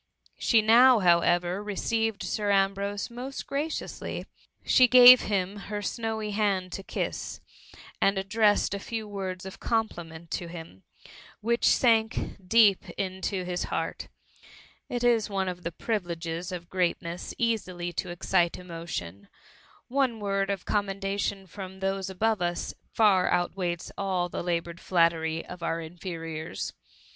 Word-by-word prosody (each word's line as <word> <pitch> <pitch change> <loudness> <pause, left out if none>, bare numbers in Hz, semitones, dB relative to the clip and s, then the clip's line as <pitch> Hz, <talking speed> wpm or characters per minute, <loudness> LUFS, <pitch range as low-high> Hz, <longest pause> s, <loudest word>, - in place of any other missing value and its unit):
She 225 -3 +4
now, 240 +3 +7
however, 175 0 +3
received 220 +1 -1
Sir 210 -1 -2
Ambrose 200 +2 0
most 255 +3 -6
gradously; 300 +3 -4 0.4
she 255 - +6
gave 250 0 +10
him 195 -1 -1
her 205 0 -3
snowy 220 0 -3
hand 200 -3 0
to 195 - -5
kiss, - - -4 0.6
and 195 0 +3
addressed 205 +2 +2
a 200 - -3
few 220 +1 -5
words 190 -3 -5
of 190 - -9
compliment 170 -8 -3
to 175 - -3
him, 165 - -10 0.6
which 235 +2 +1
sank 225 -3 +3 0.3
deep 205 0 +4
into 190 0 -2
his 180 0 -2
heart - - -3 0.8
It 245 0 -2
is 235 -3 +3
one 195 -2 -1
of 180 -1 -4
the 170 - -4
privileges 175 -3 -3
of 175 -2 -6
greatness 175 -1 -2
easily 185 -7 -1
to - - -3
excite 175 0 +1
emotion; 165 - -7 0.6
one 260 -3 0
word 195 -1 -1
of 195 -2 -3
commendation 195 -1 -1
from 190 +1 -9
those 195 0 -2
above 215 +2 0
us, 175 0 -2 0.2
far 200 -5 +4
outweighs 175 -1 -1
all 185 -3 0
the - - -4
laboured 170 -1 -2
flattery 165 -2 +1
of 180 -1 -9
our 165 0 -1
inferiors. 165 -1 -6
195 Hz, 135 wpm, -27 LUFS, 175-215 Hz, 0.8 s, gave